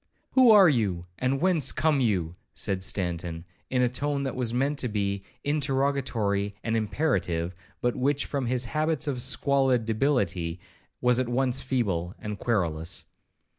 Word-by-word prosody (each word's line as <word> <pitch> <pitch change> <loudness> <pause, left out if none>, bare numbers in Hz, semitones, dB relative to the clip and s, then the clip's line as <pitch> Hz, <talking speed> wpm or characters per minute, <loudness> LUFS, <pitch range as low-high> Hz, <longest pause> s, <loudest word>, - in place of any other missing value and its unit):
'Who 260 -2 +6
are 205 -4 +8
you, 100 - +1
and 130 +2 0
whence 175 -4 +2
come 155 -3 +1
you?' 90 -9 0 0.2
said 95 -1 -2
Stanton, 85 -3 -2 0.2
in 125 -1 +2
a - - +4
tone 140 +3 -2
that 135 - -3
was 125 -3 -2
meant 140 +4 0
to 125 - +1
be 100 -2 -1 0.2
interrogatory 130 -8 0
and 110 -1 -1
imperative, 100 - 0 0.3
but 120 0 0
which, 140 +2 +1
from 140 -4 -2
his 125 0 +2
habits 155 +2 0
of 135 -4 -2
squalid 135 -3 +2
debility, 100 - 0 0.4
was 125 0 +3
at 130 -2 -1
once 125 +1 +1
feeble 100 -9 -1
and 105 -1 -6
querulous. 85 -8 -1
125 Hz, 150 wpm, -27 LUFS, 100-140 Hz, 0.4 s, are